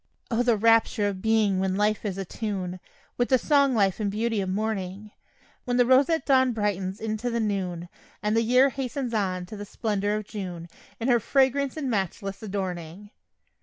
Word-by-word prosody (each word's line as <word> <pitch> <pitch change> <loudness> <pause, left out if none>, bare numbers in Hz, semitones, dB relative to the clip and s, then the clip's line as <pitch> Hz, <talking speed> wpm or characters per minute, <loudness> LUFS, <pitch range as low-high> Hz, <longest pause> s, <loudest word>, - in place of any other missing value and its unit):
O, 230 +1 +2
the 240 -3 +3
rapture 225 -1 +3
of 195 -2 -4
being 215 -3 +2
when 190 0 0
life 210 +1 +1
is 195 -2 -2
a 195 - -3
tune 185 -3 -4 0.4
With 245 - +1
the 260 - +5
song 280 -1 +3
life 195 -3 +2
and 210 -2 0
beauty 220 +1 -1
of 190 - -3
morning; 205 0 -3 0.5
When 245 -1 0
the 245 - +5
roseate 275 +6 +3
dawn 260 -2 +4
brightens 195 -3 -2
into 220 +2 -2
the 235 0 -1
noon, 185 -5 -2 0.4
And 210 +1 +1
the 230 - +4
year 250 +4 +4
hastens 265 -1 -4
on 185 -4 -1
to 195 - -9
the 205 - -6
splendor 205 0 -1
of 215 -1 -4
June, 180 -5 -6 0.3
In 230 - -2
her 240 -2 +4
fragrance 270 +3 +1
and 290 -3 -2
matchless 195 -2 -2
adorning. 190 -2 -5
215 Hz, 185 wpm, -26 LUFS, 195-240 Hz, 0.5 s, the